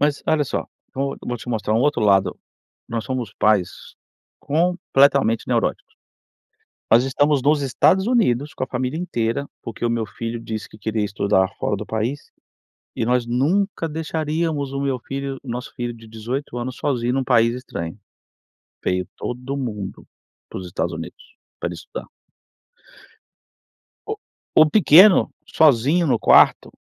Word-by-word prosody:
Mas, 145 -1 +1
olha 155 -2 +2
só, - - -3 0.3
vou 135 +1 -2
vou 120 - -3
te 120 - -11
mostrar 110 -2 -1
um 115 - +3
outro 145 0 +1
lado. 95 -3 +3 0.5
Nós 115 -1 -3
somos 125 -6 -4
pais 105 -4 +3 0.7
completamente 140 -7 +2
neuróticos. - - -1 1.0
Nós 115 +3 +6
estamos 140 +1 +2
nos 145 +1 +3
Estados 185 - +3
Unidos, 150 - +1
com - - -2
a - - -13
família 130 +4 -3
inteira, 140 -5 -2 0.2
porque 115 +1 -6
o 120 - +2
meu 115 -2 -1
filho 115 +2 -5
disse 110 -2 -6
que 105 - -15
queria 110 0 -1
estudar 100 -1 +1
fora 105 - -1
do 105 +1 -6
país, 115 +6 -3 0.7
e - - 0
nós 125 -1 +1
nunca 165 - 0
deixaríamos 155 -2 -2
o 140 - -3
meu 135 -2 -1
filho 135 +1 -5
o - - -11
nosso 120 +1 -5
filho 120 -1 -4
de 115 -1 -14
18 120 +4 -5
anos 125 +1 -4
sozinho 125 -3 -1
num 135 0 0
país 115 -2 +3
estranho. 90 -9 -6 0.9
Veio 90 0 0
todo 125 +3 -4
mundo 105 -7 -5 0.4
para - - -6
os 95 - -8
Estados 85 0 -2
Unidos, 80 0 -9 0.2
pra - - -2
ele - - -5
estudar. - - -8 2.0
O - - -3 0.4
o 155 -1 +7
pequeno, 190 +1 +7 0.2
sozinho 155 +4 +3
no 135 - +2
quarto, - - +5
125 Hz, 150 wpm, -22 LUFS, 110-145 Hz, 2.0 s, o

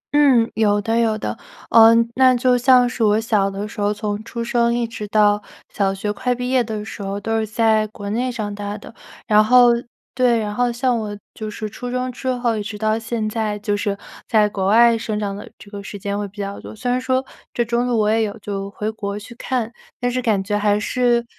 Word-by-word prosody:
嗯， 265 -6 +5
有 205 -2 +2
的 225 +2 0
有 225 -2 +1
的。 - - -4 0.4
呃， 225 -1 +8 0.2
那 260 0 +5
就 250 +1 +3
像 250 0 +5
是 245 -1 -2
我 210 0 +4
小 215 -3 +1
的 200 +1 -5
时 215 0 -7
候， 205 0 +2
从 210 0 -3
出 235 +1 -5
生 235 0 +1
一 240 0 0
直 215 -2 -7
到 210 0 +3 0.3
小 195 -1 0
学 200 +2 -3
快 250 +3 -1
毕 250 +1 -3
业 255 -2 +3
的 215 -2 -5
时 215 - -8
候， 195 0 -3
都 225 +2 -1
是 220 - -2
在 220 0 +2
国 205 -1 -9
内 250 +4 -1
长 215 -4 -4
大 205 0 -5
的。 210 - -12 0.3
然 210 0 +5
后 245 +2 +6 0.4
对， 245 -2 +3
然 210 -2 -2
后 245 +2 +1
像 245 +1 0
我 210 -1 -5 0.2
就 215 -1 -6
是 215 +1 -5
初 245 +4 -7
中 250 +1 -2
之 260 +1 -8
后 245 -2 0
一 215 - -2
直 210 0 -6
到 215 +1 +1
现 225 -1 -3
在， 215 -1 -2
就 205 0 -1
是 205 -1 -2 0.3
在 215 -2 +4
国 195 -2 -2
外 230 +3 +6
生 215 -1 -3
长 200 -2 -3
的 205 - -9
这 200 - -15
个 205 -1 -6
时 200 +1 -8
间 200 +1 -3
会 205 - -3
比 200 +2 -20
较 200 0 -4
多。 - - -10
虽 245 +3 -2
然 250 +1 0
说 260 +1 0 0.3
这 240 - -1
中 240 +1 0
途 245 -2 +1
我 210 -1 +2
也 225 +1 +2
有 210 -2 -2
就 195 -1 -5
回 210 +2 -4
国 200 -2 -5
去 220 +3 -10
看， 240 -1 -3 0.3
但 245 -1 0
是 255 +1 -1
感 215 -5 +1
觉 205 +1 -2
还 205 0 +2
是 240 +2 +1
220 Hz, 255 characters per minute, -20 LUFS, 205-240 Hz, 0.4 s, 呃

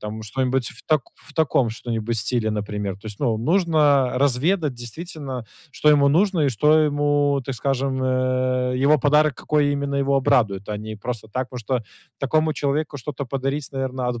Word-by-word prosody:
там 110 +1 -6
что-нибудь 130 +2 -1
в 115 - -14
тако 155 -5 +1
в - - -15
таком 135 -7 +2
что-нибудь 115 0 -3
стиле, 110 +2 0
например. 105 -2 -3
То 100 +2 -14
есть, 105 -2 -7
ну, 120 -5 +1
нужно 150 - +3
разведать 140 +4 +1
действительно, 130 0 -7 0.3
что 150 - +1
ему 145 -2 +6
нужно 185 +3 +2
и 145 - +3
что 150 +7 +4
ему, 145 -1 +2
так 135 - -4
скажем, 135 +1 -1
э, 130 0 0
его 140 +3 +4
подарок, 150 +1 +3
какой 145 -1 +1
именно 140 0 -2
его 140 0 +2
обрадует, 115 -9 +1
а 105 - -2
не 110 +1 -7
просто 115 +1 -5
так, 130 +3 -3
потому 125 - -7
что 120 +1 -1 0.4
такому 155 +3 +1
человеку 145 +1 -1
что-то 140 +2 -5
подарить, 135 +3 -2
наверно, 130 -2 -2
от 120 -1 -3
135 Hz, 175 wpm, -22 LUFS, 120-145 Hz, 0.4 s, ему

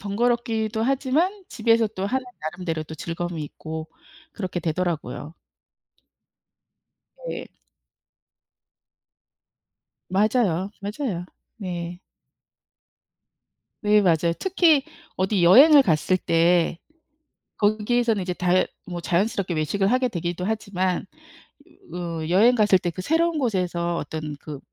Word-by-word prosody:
번거롭기도 225 +1 0
하지만 290 - 0
집에서 225 -1 +2
또 195 -2 -4
하는 260 +4 -1 0.2
나름대로 160 0 -4
또 160 - -9
즐거움이 170 0 -4
있고 160 +2 -7 0.4
그렇게 185 -3 -4
되더라고요. 165 -1 -3 1.9
네. - - -5 2.6
맞아요, 195 -2 +1
맞아요. 205 - -3 0.3
네. 175 -3 -5 1.8
네, 210 0 +4
맞아요. 170 -2 +2
특히 340 -7 +3 0.3
어디 190 -1 +1
여행을 280 - +8
갔을 175 - +2
때 170 0 +2 0.8
거기에서는 215 +1 +1
이제 180 0 -2
다 180 +1 +2 0.2
뭐 175 -1 -5
자연스럽게 185 +1 0
외식을 180 +6 0
하게 255 +1 +2
되기도 175 -1 -4
하지만 195 -4 -1 0.9
어 165 -3 -4
여행 230 +7 +5
갔을 205 -3 +4
때 175 - -1
그 170 - -7
새로운 325 - +1
곳에서 180 -8 -1
어떤 150 -1 -5
그 150 -2 -8
185 Hz, 235 characters per minute, -24 LUFS, 170-230 Hz, 2.6 s, 여행을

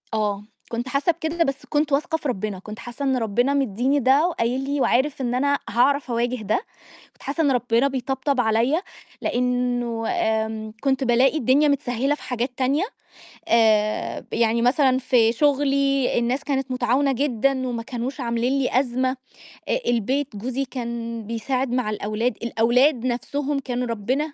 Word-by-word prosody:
آه. 210 -2 -1 0.3
كنت 235 +2 -3
حاسّة 280 +6 +2
بكده، 335 +1 -1
بس 275 -2 -3
كنت 295 0 0
واثقة 315 +4 +1
في 305 - -5
ربنا، 210 -5 -3
كنت 210 +3 -9
حاسّة 240 +4 -6
إن 265 -1 +2
ربنا 245 +4 +1
مدّيني 270 +1 +1
ده 275 +5 +4
وقايل 255 -5 -1
لي 280 +1 -1
وعارف 270 +4 +1
إن 245 -1 -1
أنا 285 +2 +2
هاعرف 275 +3 +2
أواجه 240 +1 0
ده، 215 - 0 0.5
كنت - - -20
حاسّة 295 +4 -1
إن 285 - +3
ربنا 245 0 +2
بيطبطب 265 0 -1
عليَّ، 235 +8 +2 0.4
لأنه 245 -2 -1
آمم 220 0 -1
كنت 270 -1 +1
بالاقي 255 +4 +3
الدنيا 280 +3 +3
متسهّلة 275 -1 0
في - - -17
حاجات 250 +1 -2
تانية، 270 +6 +1 0.6
آآ، 215 -2 +2
يعني 230 0 +2
مثلًا 260 +1 +3
في 250 -3 +3
شغلي 275 0 +2
الناس 250 +4 -1
كانت 270 -2 -2
متعاونة 255 +2 +1
جدًا 265 0 0
وما 235 -2 -3
كانوش 250 +3 -5
عاملين 240 +2 0
لي 255 -1 +2
أزمة، 255 0 -1 0.7
البيت 255 +3 0
جوزي 255 +6 -3
كان 235 -3 -5
بيساعد 250 +3 -2
مع 250 -3 0
الأولاد، 215 +2 -2
الأولاد 240 +3 +2
نفْسهم 280 +3 -1
كانوا 250 -2 -3
ربنا 255 +7 -2
255 Hz, 155 wpm, -23 LUFS, 235-275 Hz, 0.7 s, ده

